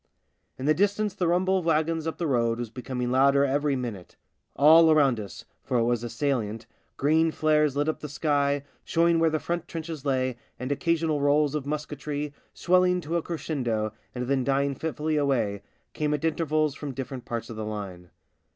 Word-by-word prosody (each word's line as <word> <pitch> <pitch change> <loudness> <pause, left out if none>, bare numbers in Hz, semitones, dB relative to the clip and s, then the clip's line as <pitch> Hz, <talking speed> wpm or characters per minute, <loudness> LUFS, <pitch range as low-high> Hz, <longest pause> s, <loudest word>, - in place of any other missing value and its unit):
In 130 - -5
the 155 - +5
distance 205 +3 +1
the 185 -3 -1
rumble 185 +2 +2
of 175 - -7
wagons 160 0 +1
up 160 - -3
the 170 - -2
road 115 -5 +1
was 120 -2 -5
becoming 125 0 -4
louder 140 +2 +4
every 140 +1 +1
minute. 115 -8 -6 0.4
All 160 +3 +7
around 140 -7 +4
us 100 -2 -8
— - - -47
for 125 - -1
it 115 - +3
was 120 0 0
a 120 - -4
salient 115 -6 -2 0.2
— - - -44
green 160 +3 +3
flares 150 -2 +2
lit 145 +1 +1
up 155 - -1
the 150 - -7
sky, 145 -1 0 0.2
showing 170 0 +2
where 165 0 +4
the 155 - 0
front 170 +1 -3
trenches 160 -3 -6
lay, 130 -3 0 0.2
and 130 +3 -4
occasional 160 0 0
rolls 145 0 +3
of 145 -2 -3
musketry, 150 0 -4 0.2
swelling 180 0 +2
to 165 +1 -4
a 170 - +2
crescendo 125 -11 -2 0.2
and 125 0 -2
then 135 -1 +1
dying 140 +1 +1
fitfully 155 +1 -2
away, 120 -9 0 0.3
came 150 -1 0
at 150 - -4
intervals 155 -2 +1
from 140 -2 -7
different 130 -1 -6
parts 115 -1 -4
of - - -7
the 110 - -4
line. 100 -5 -6
145 Hz, 195 wpm, -26 LUFS, 125-160 Hz, 0.4 s, All